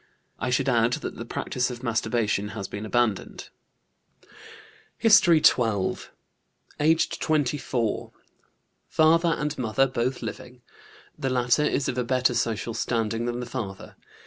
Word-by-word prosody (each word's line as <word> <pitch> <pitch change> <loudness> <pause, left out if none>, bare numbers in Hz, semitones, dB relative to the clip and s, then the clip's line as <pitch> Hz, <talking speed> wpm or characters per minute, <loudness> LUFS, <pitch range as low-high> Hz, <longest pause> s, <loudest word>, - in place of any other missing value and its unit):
I - - -2
should 125 +2 +1
add 120 -1 +2
that - - -4
the - - -6
practice 125 0 -2
of 125 0 -8
masturbation 110 -3 0
has 100 -2 -4
been 105 +1 -6
abandoned." 120 -4 -1 1.5
HISTORY 190 -8 +5
XII. 105 -6 +3 0.8
Aged 160 +2 +2
24. 140 -6 -1 0.8
Father 165 +1 +3
and 150 0 -2
mother 125 +2 +2
both 130 0 -2
living; 125 -1 -8 0.5
the 135 - -3
latter 125 +3 +2
is 145 - 0
of 125 - -2
a - - +1
better 125 0 +1
social 115 -1 -1
standing 115 0 -1
than 120 0 -3
the - - -4
father. 115 -6 -7
125 Hz, 130 wpm, -25 LUFS, 115-135 Hz, 1.5 s, HISTORY